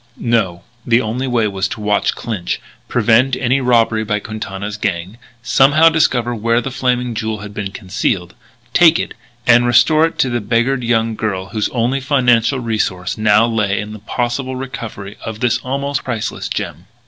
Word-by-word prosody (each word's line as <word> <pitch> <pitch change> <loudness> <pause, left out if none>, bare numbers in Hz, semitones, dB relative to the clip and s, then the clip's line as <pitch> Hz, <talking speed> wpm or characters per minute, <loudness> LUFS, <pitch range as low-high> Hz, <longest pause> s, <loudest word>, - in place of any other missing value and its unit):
No; 100 -7 0 0.2
the 115 0 +3
only 125 +3 -2
way 120 -3 +1
was 95 -1 -1
to 120 +3 -6
watch 105 -1 +1
Clinch, 105 -7 -3 0.3
prevent 120 +3 +3
any 130 +2 +1
robbery 115 -3 +2
by 105 -1 -1
Quintana's 105 -1 -6
gang, 95 +1 -3 0.2
somehow 145 +7 +5
discover 125 -7 +1
where 115 +1 +1
the 135 +2 -4
Flaming 125 -2 0
Jewel 110 -1 -3
had 105 0 -8
been 100 -1 -4
concealed, 95 -1 -2 0.4
take 165 -2 +6
it, - - -3 0.3
and 120 0 +5
restore 155 +6 +5
it 165 - -10
to 130 - +1
the 120 -1 -1
beggared 120 +5 0
young 115 -1 +1
girl 100 -3 -3
whose 110 -2 -1
only 125 +3 0
financial 130 -2 +2
resource 105 -6 -2
now 110 0 +4
lay 105 -4 0
in 105 0 -6
the 110 - -9
possible 120 +5 -2
recovery 115 -6 -7
of 110 -1 -6
this 120 -1 +1
almost 140 +2 -2
priceless 115 -4 -3
gem. - - -5
115 Hz, 170 wpm, -17 LUFS, 105-125 Hz, 0.4 s, take